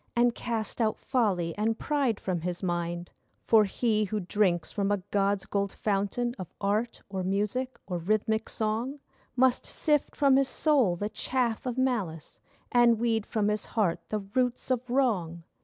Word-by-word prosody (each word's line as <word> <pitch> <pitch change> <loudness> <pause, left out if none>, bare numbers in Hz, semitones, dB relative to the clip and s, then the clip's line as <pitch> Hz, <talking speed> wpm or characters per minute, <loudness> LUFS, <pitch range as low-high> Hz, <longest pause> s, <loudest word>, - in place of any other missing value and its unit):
And 240 0 +4
cast 230 -1 -2
out 220 -1 +1
folly 190 -9 0
and 225 +1 +1
pride 275 -8 0
from 180 -3 -2
his 180 +2 -3
mind. 175 -1 -2 0.3
For 220 -2 +6
he 215 +1 +1
who 215 +1 -2
drinks 185 -2 +1
from 200 -1 0
a 205 - +3
god's 200 -1 +1
gold 200 -1 -1
fountain 210 +4 -1
Of 185 - -7
art 210 +4 0
or 190 -1 -4
music 210 +7 -1
or 180 -2 -3
rhythmic 215 +4 0
song 225 +6 -2 0.4
Must 255 0 +3
sift 300 -3 0
from 275 -2 +4
his 275 -1 +3
soul 270 - +3
the 205 +4 -3
chaff 245 0 -1
of 250 0 -3
malice, 215 - -1 0.3
And 240 -1 +5
weed 225 -2 0
from 215 -3 0
his 210 0 0
heart 190 -7 0
the 215 - 0 0.2
roots 250 0 0
of 250 0 -1
wrong. 195 -11 0
215 Hz, 165 wpm, -28 LUFS, 195-245 Hz, 0.4 s, For